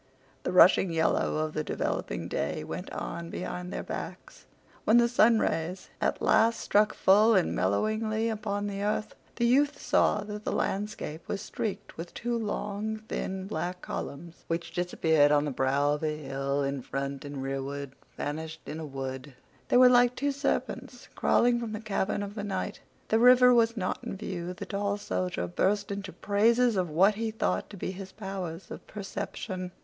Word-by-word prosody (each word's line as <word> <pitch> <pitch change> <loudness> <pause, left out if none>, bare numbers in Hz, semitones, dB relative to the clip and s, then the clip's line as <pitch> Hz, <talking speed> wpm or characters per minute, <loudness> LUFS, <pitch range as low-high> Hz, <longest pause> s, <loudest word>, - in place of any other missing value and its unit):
The - - -2
rushing 180 +1 +6
yellow 165 -1 +1
of 155 0 -1
the 155 - -1
developing - - -2
day - - -2
went - - -6
on 85 -1 -5
behind 135 - -5
their - - -4
backs. - - -7 0.4
When 220 - +5
the 235 0 +5
sunrays 190 -7 +2
at - - 0
last 230 +1 +4
struck 210 +1 +2
full 215 +4 +5
and 185 - +2
mellowingly 215 - 0
upon 210 -2 -2
the 200 -1 -3
earth, 210 +1 -1 0.2
the 235 - +1
youth 285 +4 +3
saw 210 - +2
that 210 0 -7
the - - -2
landscape 195 -5 -3
was 200 - -2
streaked 215 -3 -5
with 170 +1 -7
two 240 0 -2
long, 215 -1 -2
thin, 190 0 -3
black 180 -2 -4
columns 170 +4 -6
which 170 +1 -3
disappeared 160 -4 +3
on 145 0 +4
the 145 - -2
brow 140 +2 +2
of 150 - -4
a 155 -1 -1
hill 140 -1 -2
in 140 -1 -2
front 135 +2 -4
and 140 -2 -5
rearward 135 +1 -4 0.3
vanished 160 +2 -4
in 155 - -6
a 160 - -5
wood. 135 0 -6 0.3
They - - +5
were 255 0 +9
like 245 0 +5
two 285 +1 0
serpents 280 +1 -3
crawling 240 0 +3
from 230 -2 -4
the 215 - -3
cavern 205 -1 -1
of 200 0 -6
the 205 -1 -5
night. 190 -2 -3 0.3
The 220 - +3
river 250 +1 +7
was 230 -1 +3
not 185 -3 -2
in - - -5
view. 180 -2 -5
The - - -6
tall 200 0 -1
soldier 90 - -2
burst 200 - 0
into 200 -1 -4
praises 230 +5 +3
of 180 -3 0
what 185 +7 +4
he 225 +2 -2
thought 220 - -1
to 205 - -10
be 185 - -3
his 190 0 -8
powers 190 -4 -6
of - - -9
perception. 190 -2 -5
190 Hz, 175 wpm, -29 LUFS, 155-215 Hz, 0.4 s, were